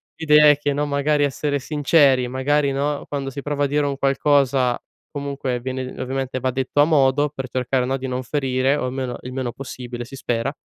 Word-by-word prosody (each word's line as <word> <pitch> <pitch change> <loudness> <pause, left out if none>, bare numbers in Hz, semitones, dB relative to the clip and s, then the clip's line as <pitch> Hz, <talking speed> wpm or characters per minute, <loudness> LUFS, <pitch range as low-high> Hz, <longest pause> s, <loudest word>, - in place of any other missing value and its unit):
l'idea 150 -1 +6
è 145 - +5
che, 145 -1 -1
no, 145 +1 -1
magari 145 +1 +1
essere 145 +1 -1
sinceri, 140 -3 +3
magari 140 +3 +1
no, 140 +1 -2
quando 140 -2 -3
si 140 +1 -7
prova 145 -1 0
a - - +1
dire 145 +1 +1
un 140 -1 -1
qualcosa, 135 -2 +2 0.4
comunque 140 -3 -3
viene 130 0 -4
ovviamente 130 0 -3
va 130 0 -1
detto 135 +2 -2
a - - +6
modo, 145 -2 +3
per 135 -2 -6
cercare 125 0 0
no, 135 +1 -1
di 135 0 -5
non 130 0 -3
ferire, 130 0 0
o 145 - -2
almeno 130 -1 -3
il 125 - -8
meno 130 -2 -3
possibile 125 -2 -7
si 135 - -11
spera, 120 +1 -2
135 Hz, 205 wpm, -21 LUFS, 130-145 Hz, 0.4 s, l'idea